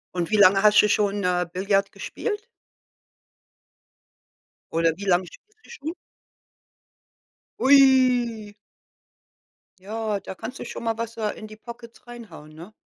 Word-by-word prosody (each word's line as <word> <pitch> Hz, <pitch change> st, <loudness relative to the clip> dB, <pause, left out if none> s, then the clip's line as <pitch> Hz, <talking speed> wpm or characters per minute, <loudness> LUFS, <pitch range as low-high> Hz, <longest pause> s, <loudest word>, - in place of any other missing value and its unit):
Und 175 Hz, +2 st, -2 dB
wie 215 Hz, -, +3 dB
lange 195 Hz, 0 st, +5 dB
hast 210 Hz, 0 st, +6 dB
du 210 Hz, -, +1 dB
schon, 205 Hz, -1 st, 0 dB
äh, 180 Hz, -1 st, +1 dB
Billard 195 Hz, +1 st, 0 dB
gespielt? 435 Hz, 0 st, -5 dB, 2.3 s
Oder 165 Hz, 0 st, +1 dB
wie 200 Hz, -, -7 dB
lange 185 Hz, -1 st, +2 dB
spielst 430 Hz, -, -19 dB
du -, -, -19 dB
schon? 330 Hz, -8 st, -6 dB, 1.7 s
Ui. 255 Hz, -6 st, +4 dB, 1.3 s
Ja, 215 Hz, 0 st, -3 dB
da 190 Hz, -, -9 dB
kannst 240 Hz, +8 st, -8 dB
du -, -, -6 dB
schon -, -, -7 dB
mal 225 Hz, -1 st, -1 dB
was, 230 Hz, 0 st, -5 dB
äh, 215 Hz, -2 st, -2 dB
in 215 Hz, -, -9 dB
die 215 Hz, -, -12 dB
Pockets 235 Hz, +1 st, -13 dB
reinhauen, 230 Hz, -11 st, -12 dB
ne? 170 Hz, +7 st, -12 dB
215 Hz, 135 wpm, -24 LUFS, 195-240 Hz, 2.3 s, hast